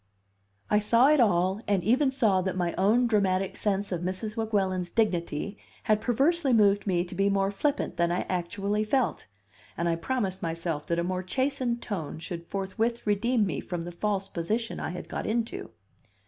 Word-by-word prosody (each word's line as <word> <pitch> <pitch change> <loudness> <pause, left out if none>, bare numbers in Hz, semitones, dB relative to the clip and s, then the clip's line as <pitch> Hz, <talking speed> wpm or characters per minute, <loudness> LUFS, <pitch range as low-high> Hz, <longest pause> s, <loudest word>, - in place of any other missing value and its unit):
I 210 - +3
saw 230 +5 +4
it 305 -1 +5
all, 190 -2 +3
and 195 -3 +1
even 260 +7 +3
saw 220 -8 +2
that 185 0 -2
my 175 -2 0
own 215 +6 +3
dramatic 195 -4 +1
sense 200 -1 -1
of 175 -2 -2
Mrs. 190 +4 -3
Weguelin's 195 -5 0
dignity 190 -2 -1 0.2
had 215 -2 +2
perversely 275 +4 +2
moved 205 -2 +4
me 175 -2 +2
to 175 - -9
be 195 +2 +2
more 195 0 +1
flippant 285 +8 -1
than 170 0 +2
I 175 - 0
actually 195 +4 -1
felt; 250 +3 0 0.5
and 170 - 0
I 170 - +2
promised 190 0 -2
myself 165 -2 -3
that 170 - 0
a 170 - +1
more 185 +1 -1
chastened 250 +3 -1
tone 175 -9 -4
should 170 +1 -7
forthwith 220 +5 -2
redeem 215 +2 +2
me 190 - -2
from 175 -2 -4
the 175 - -6
false 195 +2 -1
position 215 +8 -2
I - - -3
had 180 - -6
got - - -4
into. 225 - -2
200 Hz, 180 wpm, -28 LUFS, 180-225 Hz, 0.5 s, it